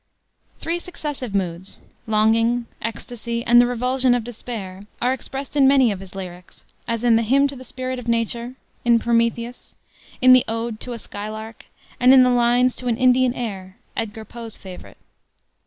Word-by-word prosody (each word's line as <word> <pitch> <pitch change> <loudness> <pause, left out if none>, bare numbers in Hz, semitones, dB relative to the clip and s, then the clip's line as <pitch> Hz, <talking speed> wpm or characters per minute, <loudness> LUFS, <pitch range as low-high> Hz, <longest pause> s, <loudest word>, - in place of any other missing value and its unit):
Three 335 +1 -2
successive 295 - -6
moods 185 0 -3 0.3
longing, 225 +2 +2 0.2
ecstasy, 235 +1 -5
and 240 0 +7
the 245 - +3
revulsion 250 +1 +2
of 245 - -1
despair 210 -5 -7
are 250 +1 +1
expressed 270 +2 -7
in 275 -2 +5
many 265 -4 +5
of 195 - -4
his 195 0 -11
lyrics; 180 -2 -9 0.2
as 230 0 -2
in 235 -2 +5
the - - +2
Hymn 270 +5 +3
to 275 - -6
the 255 - -10
Spirit 255 0 -5
of 245 - -10
Nature, 235 +2 -1 0.3
in 235 -1 +5
Prometheus, 235 +1 -1 0.4
in 255 0 +7
the 255 - +6
ode 225 0 -3
To 245 - -6
a - - -5
Skylark, 215 +1 -8 0.3
and 255 +1 +7
in 260 - +8
the 250 - +3
Lines 245 +1 +3
to 250 - -5
an 235 -2 +1
Indian 255 0 +3
Air 195 -5 -6 0.2
Edgar 220 -1 -4
Poe's 230 -1 -8
favorite. 185 -2 -11
235 Hz, 170 wpm, -22 LUFS, 220-250 Hz, 0.4 s, in